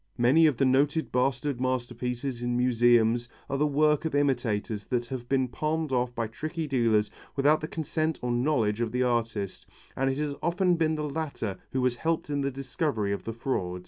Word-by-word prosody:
Many 135 +7 +5
of 145 -6 +1
the 135 - +3
noted 145 +5 +2
bastard 130 +1 0
masterpieces 125 0 -2
in 120 0 0
museums 120 -1 +3 0.2
are 140 -1 -2
the 150 - +3
work 150 +1 +2
of 160 -3 -2
imitators 115 -7 0
that 120 -1 0
have 120 -1 -6
been 130 -1 +2
palmed 155 +4 -2
off 125 -1 0
by 115 - -1
tricky 155 +9 -4
dealers 115 -6 +2 0.2
without 145 +3 +3
the 155 - -3
consent 160 0 -2
or 125 - 0
knowledge 120 -4 +1
of 115 -2 -1
the 125 +1 +1
artist, 115 -5 -2 0.3
and 135 0 +1
it 135 - -1
has 150 -1 -1
often 175 +2 +2
been 160 -1 +1
the 150 -1 -2
latter 140 -9 -4
who 130 -1 0
has 125 -1 +1
helped 160 +1 -1
in 145 -1 0
the 140 - 0
discovery 130 -5 -2
of 100 - -5
the 115 - -3
fraud. 95 -7 -2
130 Hz, 195 wpm, -28 LUFS, 120-150 Hz, 0.3 s, Many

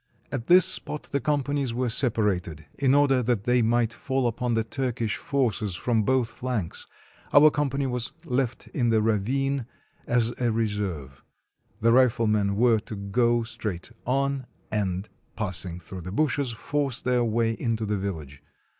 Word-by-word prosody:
At 125 -4 -4
this 180 0 +7
spot 185 -5 0
the 140 - +1
companies 140 -2 -1
were 125 +1 0
separated, 100 - 0
in 135 -1 +4
order 140 -3 +4
that 120 -4 0
they 125 +1 +3
might 115 0 +2
fall 130 0 -1
upon 120 0 0
the 115 - +1
Turkish 115 -2 -2
forces 115 -8 -1
from 115 +4 +1
both 125 +2 +1
flanks; 120 -9 -4 0.4
our 150 +1 +7
company 140 -1 -1
was 125 -2 -2
left 125 -3 -1
in 120 -4 0
the 110 -1 +3
ravine, 120 +5 0 0.4
as 120 -1 +2
a 120 -1 +2
reserve. 105 - -3 0.6
The 115 +1 +4
riflemen 110 -5 +3
were 115 0 +4
to 105 - -8
go 115 +4 +1
straight 105 -6 -5 0.2
on, 135 0 0 0.2
and, 100 -2 -1 0.3
passing 90 -4 -3
through 90 +1 -8
the 90 +2 -7
bushes, 140 +2 +1
force 135 +2 -2
their 125 -1 +1
way 115 0 +1
into 115 -1 -2
the 105 0 -1
village. 80 -8 -5
115 Hz, 155 wpm, -26 LUFS, 105-130 Hz, 0.6 s, this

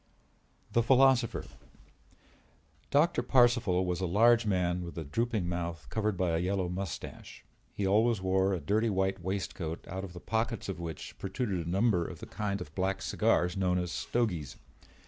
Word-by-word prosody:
THE 120 - +3
PHILOSOPHER 130 -1 +4 1.4
Doctor 155 +5 +3
Parcival 120 -8 +3
was 90 0 -2
a 95 - 0
large 115 +5 +4
man 90 -2 +1
with 85 0 -8
a 80 - -3
drooping 110 - -1
mouth 85 -4 -3
covered 105 -3 0
by 90 -2 +1
a 80 - +1
yellow 95 0 0
mustache. 90 -1 -6 0.3
He 100 - -3
always 110 +3 +3
wore 95 +1 +2
a - - -3
dirty 110 +6 +1
white 95 -1 0
waistcoat 90 -3 -4
out 95 +2 -5
of 95 -3 -7
the 90 - -8
pockets 115 +3 -2
of 95 -3 -4
which 80 -3 -6
protruded 95 -4 -2
a - - -3
number 95 -1 +2
of - - -8
the - - -9
kind 100 -2 -3
of 80 -3 -8
black 95 +1 -1
cigars 90 0 +1
known 90 -2 +1
as 90 -1 -2
stogies. 90 - -2
95 Hz, 165 wpm, -30 LUFS, 90-110 Hz, 1.4 s, PHILOSOPHER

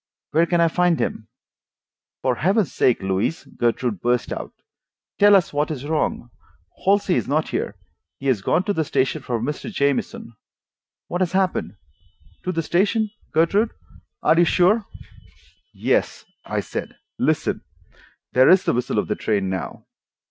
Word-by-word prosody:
Where 165 +2 +3
can 175 0 +1
I 170 - +5
find 175 0 +2
him?" 110 - -3 1.0
"For 130 - +2
Heaven's 195 -1 +1
sake, 120 -6 +2
Louise," 95 +11 -1
Gertrude 120 -3 -1
burst 120 0 0
out, - - -6 0.7
"tell 205 0 +7
us 185 -6 +2
what 145 +1 0
is 145 -3 -5
wrong. 150 -5 -1 0.5
Halsey 200 -1 +3
is - - 0
not 155 +3 0
here. - - -3 0.4
He 135 - -11
has 130 -7 +2
gone 175 - +1
to 205 - 0
the 160 - 0
station 145 +1 0
for 120 -2 -2
Mr. 150 - -4
Jamieson. 140 - -1 0.7
What 175 - -3
has 185 0 0
happened?" 185 - 0 0.7
"To 185 - 0
the 165 -2 -2
station, 210 +6 +1 0.2
Gertrude? 195 +8 +2
You - - -35 0.4
are 170 +2 +5
sure?" 195 +5 +3 0.8
"Yes," - - -1 0.2
I - - -2
said. - - -6 0.2
"Listen. - - 0 0.7
There 130 +1 +6
is 185 0 +6
the - - +1
whistle 125 -2 -1
of 105 - +1
the 105 - 0
train 100 -3 -1
now." 95 - -5
160 Hz, 155 wpm, -22 LUFS, 125-185 Hz, 1.0 s, tell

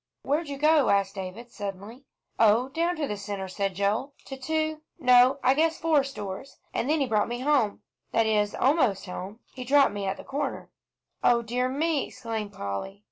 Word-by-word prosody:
"Where'd 300 +4 0
you 280 - -4
go?" 305 -1 +4
asked 200 -1 +2
David, 195 +5 -7
suddenly. 205 +6 -7 0.3
"Oh, 225 +4 +4
down 335 +4 0
to 300 -3 -2
the 210 - -3
Centre," 200 -1 -5
said 195 0 -2
Joel, 215 +9 -1
"to 270 - -7
two 310 +3 -2 0.2
no, 250 +1 +5
I 260 - +5
guess 320 +3 +2
four 315 -4 +3
stores, 235 -2 -7 0.2
and 250 - -1
then 310 0 +2
he - - +3
brought 215 -4 +1
me 240 +1 -4
home 260 -7 +1 0.3
that 225 - +3
is, 210 -1 +1
almost 260 - +2
home. 195 +4 -7
He 255 - -6
dropped 275 -1 +4
me 200 -1 -3
at 190 - -2
the - - -9
corner." 275 +2 -4 0.5
"O 235 -1 +4
dear 250 +2 -1
me!" 300 +2 0
exclaimed 220 -3 -5
Polly. 100 - -5
245 Hz, 190 wpm, -27 LUFS, 205-280 Hz, 0.5 s, no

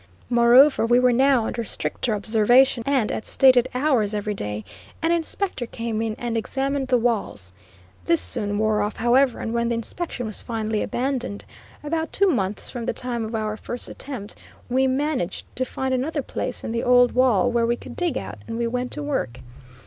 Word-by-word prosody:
Moreover, 240 +4 +6
we 240 +1 +4
were 250 0 +4
now 260 -2 +3
under 235 - -3
stricter 225 +1 -2
observation, 235 +5 +4
and 265 -6 +1
at - - -4
stated 255 -2 +5
hours 250 -7 +1
every 210 0 -2
day, 105 - -5 0.3
an 330 0 +1
inspector 340 -5 -2
came 230 -1 -3
in 225 -1 -2
and 240 -1 -3
examined 270 +4 -1
the 255 -1 +3
walls. 210 - -2 0.5
This 335 -1 +3
soon 205 -4 -2
wore 215 0 +1
off, 210 +1 -2
however, 245 +2 +3
and 225 - -3
when 235 0 0
the 235 - 0
inspection 245 +3 -5
was 215 -2 -4
finally 220 -2 -2
abandoned, 255 -4 -3 0.4
about 320 +2 -2
two 395 0 +3
months 205 - -1
from 240 -2 -6
the - - 0
time 240 -2 -3
of 220 +1 -4
our 215 -1 -2
first 240 +3 -6
attempt, 245 -8 -7 0.4
we 260 +2 +2
managed 265 - -1
to 255 - -1
find 265 +1 -3
another 280 +3 -1
place - - -4
in - - -4
the 235 0 -1
old 245 0 +5
wall 245 -2 +3
where 235 -1 +1
we 240 - +2
could - - -11
dig 350 -4 -1
out 100 +2 -6
and 230 - -4
we 235 - 0
went 250 +2 -2
to 300 - -4
work. 195 - -3
240 Hz, 190 wpm, -23 LUFS, 220-265 Hz, 0.5 s, Moreover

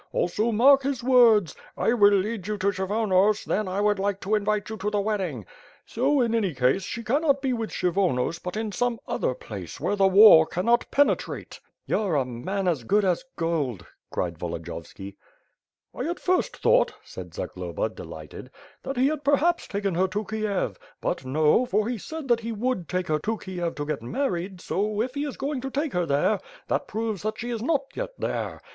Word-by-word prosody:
Also 215 +6 0
mark 270 +5 +6
his 265 -2 -2
words, 235 - +5 0.2
*I 230 - +2
will 205 -4 +6
lead 200 0 -2
you 210 0 -2
to 200 +1 +1
Kshyvonos 200 +1 +1
then 210 -2 -1
I 190 +2 -1
would 205 -1 +2
like 200 0 -1
to 205 - -2
invite 210 0 +1
you 220 - -5
to 205 +1 -2
the 210 -1 0
wedding,' 190 - -2 0.4
so, 270 +4 +1
in 230 -2 +1
any 200 -9 0
case, 130 +8 +2
she 230 +5 -5
cannot 280 +4 +2
be 265 -2 -1
with 230 -2 -3
Kshyvonos 170 -5 0
but 180 +3 -5
in 220 -1 -2
some 240 +3 -1
other 130 - -1
place, 100 -8 -8
where - - 0
the 195 -1 +4
war 190 -5 +8
cannot 235 +7 +1
penetrate." 285 +1 0 0.3
"You're 200 -7 0
a 135 -3 +2
man 180 +11 -3
as 155 -9 0
good 205 - +2
a« 185 -2 +3 0.2
gold," 145 - -2 0.2
cried 85 -3 -3
Volodiyovski. 85 +3 -7 0.8
"I 265 +6 -3
at 345 - -3
first 365 0 0
thought," - - +3
said - - -10
Zagloba, - - -3
delighted, - - -10 0.3
"that 270 -1 -5
he 255 - +3
had 300 +1 0
perhaps 295 +5 +2
taken 200 -2 -2
her 185 +3 +2
to 210 +3 -3
Kiev 215 -3 -2
— - - -36
^but, - - -2
no, 150 - +3
for 210 +1 +1
he 240 -2 -2
said 315 +6 -7
that 240 -1 +4
he 230 0 -5
would 220 -5 -2
take 180 0 -1
her 155 -1 0
to 220 +7 -2
Kiev 175 -4 -4
to 145 - -4
get 150 -3 -3
married 180 - -3
so 210 +4 -1
if 250 +3 -1
he 285 +1 -2
is 285 - -6
going 275 -1 -3
to 270 - -4
take 285 +1 -2
her. 180 -1 0
there, 145 +8 +2 0.3
that - - 0
proves 220 -2 -3
that 215 +1 -3
she 240 +1 -4
is 230 -2 -3
not 280 +2 +1
yet - - -4
there. - - -3
210 Hz, 200 wpm, -25 LUFS, 180-240 Hz, 0.8 s, war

